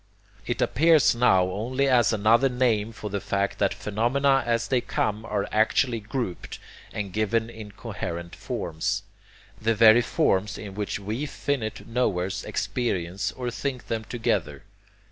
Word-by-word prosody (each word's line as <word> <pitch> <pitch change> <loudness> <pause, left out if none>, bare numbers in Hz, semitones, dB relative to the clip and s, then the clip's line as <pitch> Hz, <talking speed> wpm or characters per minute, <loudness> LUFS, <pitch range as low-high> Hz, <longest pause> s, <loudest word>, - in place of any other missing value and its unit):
It 120 - 0
appears 160 -2 +4
now 95 -6 +4
only 130 +8 -1
as 125 -4 +4
another 115 +5 +4
name 115 -4 +1
for 105 -2 -7
the 100 -1 -2
fact 100 0 -1
that - - +2
phenomena 120 +7 +1
as 115 0 +1
they 130 -2 +2
come 105 -1 -1
are 105 -3 -2
actually 115 +2 +2
grouped 110 -3 -5 0.3
and 100 -3 -5
given 110 +2 0
in 110 -3 -10
coherent 85 -6 -6
forms, 80 0 -3 0.6
the 115 +1 +2
very 110 +2 +7
forms 100 -2 +1
in 100 -3 -8
which 105 0 -3
we 110 +9 -3
finite 120 -6 -3
knowers 100 -6 -1
experience 95 -6 -2
or 125 -2 -4
think 130 0 -4
them 110 -1 -2
together. 120 0 -2
110 Hz, 145 wpm, -25 LUFS, 100-125 Hz, 0.6 s, very